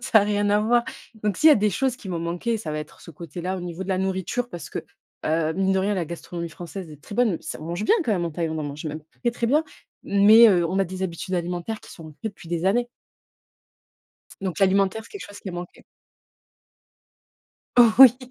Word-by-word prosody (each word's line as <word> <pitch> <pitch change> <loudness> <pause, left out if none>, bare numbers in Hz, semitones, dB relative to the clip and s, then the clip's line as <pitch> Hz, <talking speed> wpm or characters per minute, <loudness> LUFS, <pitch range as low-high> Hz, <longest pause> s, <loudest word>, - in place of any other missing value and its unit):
ça 240 -2 +4
a - - +2
rien 205 0 +1
à 210 +1 +4
voir, 235 +2 +3 0.4
donc 205 -3 +1
s'il 315 - +6
y - - +9
a - - +7
des 210 0 +2
choses 255 +5 0
qui 195 - -10
m'ont 175 - -2
manquées, 175 +7 -2
ça 180 - -5
va 155 - -3
être 150 0 -9
ce - - -12
côté-là 175 +4 -5
au - - -5
niveau 175 +1 -5
de 190 - -8
la 185 -1 +1
nourriture, 190 +6 -2
parce 170 -4 -8
que, - - -4 0.5
heu, 160 0 +1
mine 195 0 +1
de 190 - +2
rien, 205 +2 0
la 180 -3 -1
gastronomie 170 +1 -6
française 175 +2 -8
est 150 -1 -12
très - - -9
bonne. 225 -9 +2
S - - -6
on - - -8
mange 175 +5 -3
bien - - +5
quand 225 - +1
même 175 -4 0
en 170 - -2
Thaïlande, 160 0 -3
on - - -2
en - - -3
mange 145 +3 -8
même 155 +1 -5 0.2
très, 240 - +2
très 235 0 -2
bien, 300 +6 +3 0.4
mais 215 +3 +7
heu, 175 -4 +3
on 190 +3 -1
a 195 - +3
des 185 +1 -6
habitudes 185 +1 -3
alimentaires 175 +5 -3
qui - - -15
sont 165 - -11
ancrées 155 +8 -6
depuis 190 -5 -13
des 170 0 -2
années. 240 +5 +2 1.5
Donc 185 -3 -3
l'alimentaire, 195 +2 +2
c'est - - -16
quelque 405 - -8
chose 205 - -12
qui 190 - -6
manquait. 175 0 -8 2.0
Oui. 245 +1 +8
190 Hz, 235 wpm, -24 LUFS, 170-215 Hz, 2.0 s, y